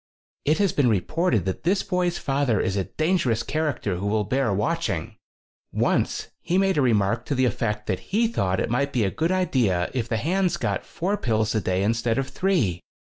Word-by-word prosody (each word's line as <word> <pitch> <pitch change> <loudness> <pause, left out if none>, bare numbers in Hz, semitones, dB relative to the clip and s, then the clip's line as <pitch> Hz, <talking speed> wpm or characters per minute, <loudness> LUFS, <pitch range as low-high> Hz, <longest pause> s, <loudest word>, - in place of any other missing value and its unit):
"It 155 +2 +3
has 200 -2 +2
been 135 -4 +3
reported 110 - +1
that 95 - -3
this 190 +5 +1
boy's 180 -2 0
father 135 -6 0
is 95 - 0
a 95 -2 0
dangerous 135 - 0
character 145 - -1
who 100 +3 -3
will 105 +1 +1
bear 130 +2 0
watching. 100 +2 -1 0.6
Once - - 0
he 175 +2 0
made 195 -4 +2
a - - +4
remark 115 -2 +2
to 145 - -1
the 130 0 +2
effect 105 -2 -1
that 95 -3 -1
he 225 +4 +2
thought 95 - 0
it - - -1
might 140 +3 0
be 120 - +2
a 95 - 0
good 165 +2 0
idea 120 - +1
if 120 -3 -2
the 115 - 0
hands 180 - 0
got - - -2
four 195 +5 -2
pills 110 - 0
a 110 - +1
day 95 +1 0
instead 115 +2 +1
of 135 -1 -1
three. 120 - 0
125 Hz, 200 wpm, -24 LUFS, 105-170 Hz, 0.6 s, a